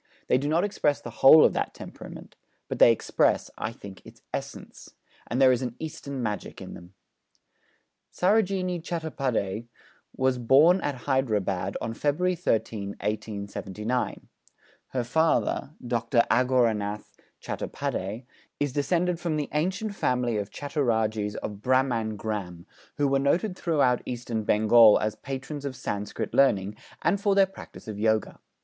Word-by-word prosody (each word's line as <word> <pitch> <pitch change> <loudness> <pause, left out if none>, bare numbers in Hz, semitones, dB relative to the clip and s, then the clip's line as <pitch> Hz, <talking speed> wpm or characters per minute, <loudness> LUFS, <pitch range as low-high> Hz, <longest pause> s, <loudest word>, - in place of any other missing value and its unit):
They - - +2
do 140 - -2
not 165 +3 +2
express 150 -8 0
the - - -8
whole 150 +3 +9
of - - +3
that - - -2
temperament; - - -10 0.3
but - - -5
they - - +8
express, 115 - +1
I - - -3
think, 100 -4 -11
its - - -16
essence; - - -7 0.3
and 120 - -2
there 130 -1 +7
is 125 0 +1
an 125 -2 -4
Eastern 140 -4 -6
magic 105 -3 -4
in - - -8
them. 90 +2 -13 1.2
Sarojini 185 -3 +1
Chattopâdhyây 135 - -2 0.5
was 130 -1 +1
born 150 +10 +5
at 135 -4 -4
Hyderabad 105 -8 0
on 115 - -4
February 150 +9 0
13, 110 - -1
1879. 105 +2 -3 0.6
Her 125 -2 -2
father, 155 +2 +1
Dr. 120 0 +2
Aghorenath 115 -5 +1 0.3
Chattopâdhyây, 105 +7 -4 0.3
is 145 -3 -1
descended 170 +5 0
from 170 -3 -2
the 150 -1 -2
ancient 190 +8 -1
family 125 - 0
of 100 0 -4
Chattorajes 110 -8 -1
of 105 -1 -6
Bhramangram, 110 -8 -1 0.3
who 145 -1 +2
were 135 0 +2
noted 175 +8 +1
throughout 145 -9 +1
Eastern 120 -3 -3
Bengal 110 +1 +6
as 110 0 -1
patrons 135 +4 -6
of 140 -2 -4
Sanskrit 105 0 -4
learning, 105 -7 +3 0.3
and 200 - +1
for 200 -1 +2
their 195 -1 +6
practice 190 -10 -13
of 105 -2 -6
Yoga. 110 -1 0
125 Hz, 140 wpm, -26 LUFS, 110-150 Hz, 1.2 s, whole